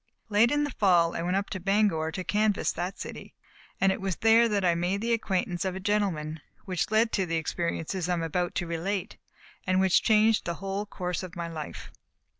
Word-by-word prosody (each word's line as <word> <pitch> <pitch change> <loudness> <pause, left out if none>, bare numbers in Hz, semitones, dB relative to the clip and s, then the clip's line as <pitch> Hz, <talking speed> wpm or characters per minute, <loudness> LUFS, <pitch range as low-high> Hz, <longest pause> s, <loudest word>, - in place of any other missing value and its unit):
Late 215 +3 +4
in 290 0 +2
the 290 - -2
fall 175 -7 +3
I - - -2
went 180 +2 0
up 200 - -3
to 190 - -3
Bangor 195 -4 +1
to 185 - -4
canvass 210 +1 +1
that 180 +2 -4
city, - - -8 0.4
and 195 - +4
it 190 - -3
was 190 -2 -1
there 225 +3 +5
that 200 -3 0
I 175 - +4
made 175 +4 -1
the 235 +2 0
acquaintance 185 -5 -1
of 190 -1 -2
a - - -4
gentleman, 185 -7 -1 0.3
which 185 -1 -1
led 220 +2 +3
to 190 -3 0
the 165 - -1
experiences 170 +2 -2
that 180 - +1
I - - +2
am 165 - -2
about 175 +2 -1
to 175 - -1
relate, 175 +4 -3 0.5
and 185 0 +3
which 190 -2 +4
changed 220 0 +3
the 170 - -2
whole 195 +2 -4
course 180 -3 -3
of 185 -3 -8
my 170 -1 -4
life. 155 -3 -7
190 Hz, 220 wpm, -28 LUFS, 170-205 Hz, 0.5 s, there